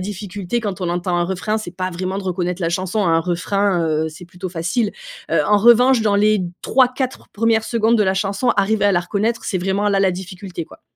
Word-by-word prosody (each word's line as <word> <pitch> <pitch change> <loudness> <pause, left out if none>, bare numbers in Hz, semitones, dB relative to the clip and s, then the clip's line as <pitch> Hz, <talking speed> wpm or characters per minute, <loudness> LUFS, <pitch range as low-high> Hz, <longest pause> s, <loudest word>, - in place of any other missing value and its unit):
difficulté, 200 +1 -4
quand 200 -5 -4
on 180 - -1
entend 175 +1 -1
un 175 - +1
refrain, 190 +4 -2
c'est 215 -5 -7
pas 185 0 -2
vraiment 185 +2 -3
de - - -5
reconnaître 180 0 -2
la 165 - +1
chanson. 185 +4 -1
Un 165 -2 +3
refrain, 180 +1 0
heu, 155 0 0
c'est 160 +3 -11
plutôt 180 +2 -7
facile. 185 +6 -1 0.4
Heu, 165 - +3
en 210 - +4
revanche, 240 +3 +5
dans 210 -2 +2
les 210 -1 +3 0.2
3-4 255 +1 +1
1res 225 +1 +1
secondes 230 0 +2
de - - +4
la 190 -1 +1
chanson, 195 +5 -1
arriver 205 +1 +2
à 200 - +3
la 175 - +2
reconnaître, 210 +6 -2
c'est 185 - -1
vraiment 195 +3 0
là, 200 -1 +2
la 195 -1 +3
difficulté, 185 -1 -7
quoi. 155 - -17
195 Hz, 220 wpm, -20 LUFS, 180-215 Hz, 0.4 s, revanche